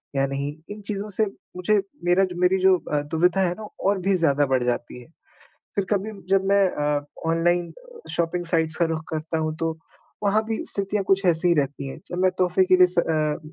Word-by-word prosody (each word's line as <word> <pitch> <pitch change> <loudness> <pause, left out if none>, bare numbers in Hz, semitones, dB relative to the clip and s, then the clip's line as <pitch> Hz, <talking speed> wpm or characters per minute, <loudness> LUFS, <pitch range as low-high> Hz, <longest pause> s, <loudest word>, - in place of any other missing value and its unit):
या 135 0 +2
नहीं? 140 +1 -3 0.2
इन 210 +1 -7
चीज़ों 210 0 -3
से 210 +2 +1 0.3
मुझे 200 +3 +2 0.2
मेरा 180 +2 +4 0.2
मेरी 180 +1 +4
जो 190 0 +5
अ, 150 -3 -2
दुविधा 175 +3 +2
है 175 -2 +1
ना 215 -1 -7 0.2
और 200 0 +2
भी 195 - +4
ज़्यादा 145 -5 +2
बढ़ 130 -1 +1
जाती 120 0 -3
है। - - -15 0.7
फ़िर 200 - 0
कभी 205 +1 0 0.2
जब 195 0 +3
मैं 200 0 +4
अ, 145 -1 -1 0.2
ऑनलाइन 175 +1 +1 0.4
शॉपिंग 175 +1 -1
साइट्स 160 -2 +1
का 170 - +3
रुख 160 -1 -2
करता 160 +1 -3
हूँ 155 0 -2
तो 165 -1 -1 0.5
वहाँ 210 +2 +2
भी 225 0 -2
स्थितियाँ 200 0 -1
कुछ 195 0 +2
ऐसी 175 0 +3
ही 175 - +5
रहती 140 -1 -1
हैं। 135 - -8
जब 175 - -5
मैं 185 - +4
तोहफ़े 185 +1 +3
के 185 - +5
लिए 180 0 +7
स 180 -1 +1
अ, 155 -3 0
175 Hz, 210 wpm, -24 LUFS, 155-195 Hz, 0.7 s, लिए